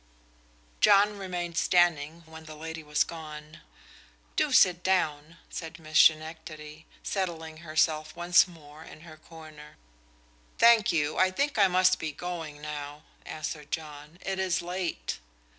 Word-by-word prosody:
John 205 0 +4
remained 175 -3 -3
standing 170 -2 +2
when 160 0 -12
the 155 0 -10
lady 160 +1 -7
was 150 -1 +1
gone. 155 -1 -10 0.7
"Do 300 -2 +1
sit 180 -8 +5
down," 165 -4 -1
said 165 -1 -7
Miss 155 -1 0
Schenectady, 155 -1 +1 0.2
settling 165 -5 -4
herself 155 -1 0
once 175 +2 +4
more 155 -3 -14
in 155 - -13
her 160 -2 -13
corner. 155 - -14 0.8
"Thank 230 -2 +6
you, 150 -3 0
I 185 - +5
think 275 +5 -1
I 200 - +6
must 185 0 +3
be 160 - -3
going 160 -2 -7
now," 150 0 -7 0.2
answered 150 -1 -6
John. 150 0 -6
"It 195 -1 -2
is 185 -1 0
late." 180 0 -4
160 Hz, 135 wpm, -28 LUFS, 155-180 Hz, 0.8 s, Thank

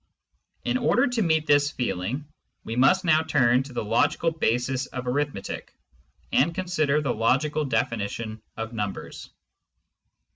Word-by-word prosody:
In 255 - +1
order 240 - +3
to 245 -2 0
meet 160 -4 +2
this 145 -1 +4
feeling, 125 +1 -3 0.4
we 115 - -5
must 155 +10 +4
now 155 -2 +4
turn 130 -6 +3
to 135 +1 -8
the 120 - -3
logical 145 +9 +1
basis 130 -3 0
of 125 -1 -6
arithmetic, 135 -4 -3 0.6
and 160 +5 +2
consider 155 -6 +1
the 140 -4 0
logical 145 +7 +1
definition 110 -3 -2 0.2
of 110 +1 -5
numbers. 105 -3 -5
135 Hz, 135 wpm, -25 LUFS, 115-155 Hz, 0.6 s, this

